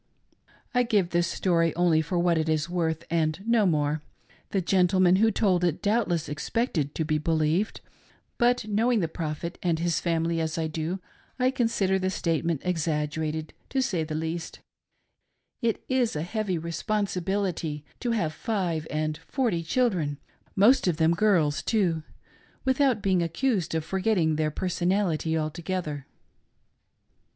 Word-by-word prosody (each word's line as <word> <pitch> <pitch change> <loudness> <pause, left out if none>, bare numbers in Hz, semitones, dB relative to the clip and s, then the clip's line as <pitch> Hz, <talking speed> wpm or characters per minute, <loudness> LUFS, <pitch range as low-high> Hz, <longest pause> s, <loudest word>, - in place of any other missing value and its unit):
I 250 - +4
give 205 -7 +1
this 175 0 +2
story 165 -2 +1
only 170 -2 +3
for 175 +3 -2
what 170 0 +3
it 160 0 -1
is 155 0 +1
worth 165 -2 -1
and 160 -1 +1
no 230 -3 +3
more. 150 -2 +1 0.5
The 195 - 0
gentleman 185 0 +3
who 225 +3 +4
told 190 -4 +2
it 170 -3 +1
doubtless 200 -7 +1
expected 150 - -2
to 160 - -1
be 155 0 +1
believed; 160 +5 0 0.6
but 245 -1 +3
knowing 220 +2 +2
the 165 - 0
Prophet 160 +1 -5
and 170 -3 +1
his 170 -1 0
family, 165 -1 0
as 160 +1 -2
I 165 - 0
do, 160 +4 -3 0.4
I 255 0 +2
consider 225 -7 +1
the 185 0 0
statement 165 -4 -1
exaggerated, 155 -2 -1 0.2
to 270 - 0
say 185 -10 0
the 155 0 -4
least 160 +1 -4 1.0
It 230 -2 0
is 255 -6 +1
a 150 - -1
heavy 200 -1 -2
responsibility 180 -2 -2
to 245 - -2
have 175 -10 0
five 175 -7 -2
and 155 0 -1
forty 215 -1 -1
children 165 - 0 0.2
— - - -36
most 255 -2 +5
of 170 -4 +1
them 160 0 +3
girls, 165 -7 +2
too 175 -4 +1 0.3
— - - -32
without 260 -4 +2
being 185 -2 +2
accused 175 - 0
of 160 -1 -1
forgetting 185 -4 +1
their 155 0 +1
person 175 +2 -1
ality 165 -5 +1
altogether. 155 -2 -3
170 Hz, 150 wpm, -27 LUFS, 160-200 Hz, 1.0 s, most